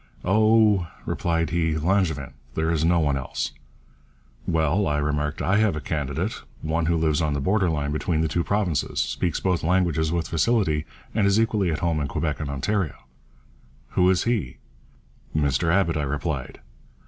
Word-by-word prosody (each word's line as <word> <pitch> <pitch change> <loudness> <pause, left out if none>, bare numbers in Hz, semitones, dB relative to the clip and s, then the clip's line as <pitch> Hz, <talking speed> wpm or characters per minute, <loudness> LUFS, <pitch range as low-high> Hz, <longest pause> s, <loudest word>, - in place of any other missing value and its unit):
'Oh,' 105 -2 +4 0.2
replied 85 -2 -1
he, 80 -2 +1
'Langevin; 80 -6 0 0.2
there 80 +1 +1
is 80 -2 +1
no 85 +1 +3
one 75 -3 +1
else.' 70 - -3 1.0
'Well,' 80 +5 +1
I 75 - 0
remarked, 75 0 -1
'I 95 +2 +2
have 110 -6 +2
a - - -2
candidate 70 -1 -3 0.2
one 80 +1 0
who 85 0 +2
lives 80 -2 +1
on 75 -2 0
the 70 - -1
border 95 +5 +2
line 75 -2 -1
between 80 +1 0
the 80 - +1
two 85 +2 0
provinces, 95 -9 -1
speaks 85 -3 -1
both 90 -3 0
languages 80 -3 +1
with 85 -1 -1
facility, 80 -4 +1 0.3
and 105 -2 +2
is 100 +2 +3
equally 110 -5 +1
at 75 - -3
home 85 -2 +1
in 70 - -1
Quebec 75 +2 -2
and 75 -2 -4
Ontario.' 80 +5 -1 0.9
'Who 90 0 +3
is 95 -2 +2
he?' 110 - -1 0.8
'Mr 75 +3 +1
Abbott,' 85 -3 +2
I - - 0
replied. 70 -1 -3
80 Hz, 170 wpm, -24 LUFS, 75-95 Hz, 1.0 s, Oh